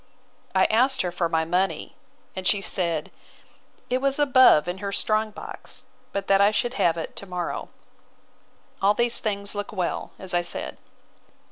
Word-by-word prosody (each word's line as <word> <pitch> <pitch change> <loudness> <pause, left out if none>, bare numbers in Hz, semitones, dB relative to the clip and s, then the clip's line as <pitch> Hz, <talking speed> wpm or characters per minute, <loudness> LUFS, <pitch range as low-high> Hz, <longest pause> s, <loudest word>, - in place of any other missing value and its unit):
I 190 - +5
asked 255 +3 +3
her 180 - -2
for 175 -1 -1
my 160 -1 +1
money; 180 +4 -1 0.4
and 185 -1 -2
she 205 - +4
said, 170 -5 -1 0.8
it 255 +1 0
was 275 0 +2
above 260 - +6
in 180 +2 -3
her 200 0 -3
strong 215 +2 +1
box, 210 - -7 0.3
but 200 - -3
that 195 0 +4
I 200 - +6
should 240 +3 0
have 170 -10 +2
it 165 - -5
to 200 - -5
morrow. 180 -2 -4 1.1
All 200 +2 +4
these 235 +1 +1
things 200 -2 -3
look 205 -1 -4
well, 185 -5 -2
as 190 -1 -3
I 175 - +3
said. 175 - -5
195 Hz, 165 wpm, -25 LUFS, 180-220 Hz, 1.1 s, above